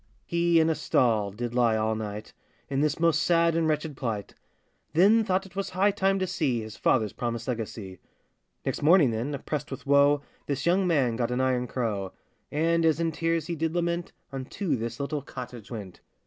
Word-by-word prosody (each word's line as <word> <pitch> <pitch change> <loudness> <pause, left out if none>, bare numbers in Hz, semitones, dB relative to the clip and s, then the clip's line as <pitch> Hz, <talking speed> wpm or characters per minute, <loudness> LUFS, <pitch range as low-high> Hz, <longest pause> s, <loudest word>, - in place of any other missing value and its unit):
He 170 -1 +3
in 160 - +4
a 165 - +3
stall 110 -8 +1
did 120 +4 -5
lie 120 -3 +3
all 110 0 +1
night, 105 -1 -6 0.4
In 135 0 +1
this 150 +1 +1
most 165 -2 +3
sad 170 -1 +3
and 165 -1 +2
wretched 155 -1 -1
plight; 110 -6 -4 0.6
Then 205 +7 +5
thought 195 -2 0
it 190 -1 -15
was 195 0 -2
high 190 +3 +2
time 195 0 +1
to 190 - 0
see 155 -9 0
His 110 -1 -8
father's 110 -5 +1
promised 115 -1 -3
legacy. 110 -6 -5 0.7
Next - - -2
morning, 155 -4 +5
then, 120 +6 -2
oppressed 145 +1 -4
with 135 - -7
woe, 140 +1 +4 0.2
This 140 -2 -2
young 180 +2 +3
man 130 -9 +2
got 120 -1 0
an 125 +1 -1
iron 130 -1 +1
crow; 105 -7 -2 0.4
And, 165 +2 +2
as 160 -1 +3
in 165 -1 +1
tears 165 0 -1
he 170 - -3
did 160 +1 -2
lament, 170 0 -1 0.2
Unto 135 +5 -2
this 115 -1 -4
little 145 +1 -2
cottage 125 -5 -9
went. 100 -6 -8
140 Hz, 190 wpm, -27 LUFS, 115-170 Hz, 0.7 s, Then